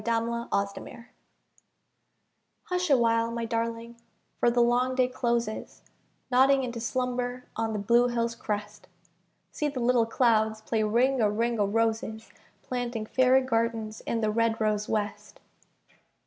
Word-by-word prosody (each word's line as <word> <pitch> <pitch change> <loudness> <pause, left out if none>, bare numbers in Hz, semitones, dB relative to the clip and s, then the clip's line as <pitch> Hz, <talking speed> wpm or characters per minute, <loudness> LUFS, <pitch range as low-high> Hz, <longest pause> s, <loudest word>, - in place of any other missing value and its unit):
RING 230 +1 0
O' 235 0 -4 0.2
ROSES 200 +3 -10 1.6
Hush 360 -1 -2
a 275 - +6
while, 230 -1 +2
my 230 0 -3
darling, 230 0 -3 0.4
for 240 - +4
the 240 +1 +1
long 245 +2 +2
day 255 -1 +3
closes, 235 -3 -3 0.5
Nodding 265 +2 +4
into 240 -2 -4
slumber 250 +1 -2
on 225 0 -1
the - - -2
blue 235 +4 +3
hill's 235 -1 -1
crest. 210 -3 -5 0.6
See 300 - -2
the 280 -3 -4
little 240 -1 +2
clouds 220 -2 +2
play 220 0 -1
Ring 240 +5 +2
a 210 - +3
ring 230 +2 -1
o' 205 - +2
roses, 225 +1 -1 0.3
Planting 245 -3 -3
Fairy 260 +3 +4
gardens 225 -3 -1
in 230 - -1
the 215 -1 +1
red 230 0 +1
rose 210 -1 0
West. 210 -1 -3
230 Hz, 145 wpm, -27 LUFS, 220-245 Hz, 1.6 s, a